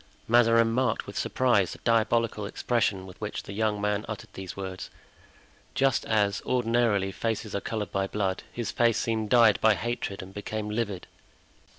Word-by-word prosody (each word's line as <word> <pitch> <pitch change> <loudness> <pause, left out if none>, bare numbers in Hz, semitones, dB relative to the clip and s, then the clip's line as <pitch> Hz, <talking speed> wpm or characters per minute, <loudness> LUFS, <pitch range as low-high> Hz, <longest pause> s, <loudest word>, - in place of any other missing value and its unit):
Mazarin 115 -1 +5
marked 130 +2 0
with - - -9
surprise 115 -8 +2
the - - -10
diabolical 115 -2 +1
expression 100 -4 0
with 95 +2 -13
which 105 - -4
the 100 - -8
young 105 0 0
man 105 0 0
uttered 110 -2 -7
these 95 0 -7
words. 95 -1 -6 0.9
Just 135 -3 +2
as, 100 -3 +1
ordinarily, 115 -5 +1
faces 110 0 -3
are 100 - -1
colored 105 -1 -4
by 95 0 0
blood, 95 -2 -1
his 120 -2 -3
face 115 -2 +2
seemed 110 -2 -1
dyed 115 -3 +5
by 110 -1 +5
hatred 105 -3 -3
and 95 +1 -12
became 105 +1 -4
livid. 105 -5 -2
110 Hz, 165 wpm, -27 LUFS, 100-115 Hz, 0.9 s, Mazarin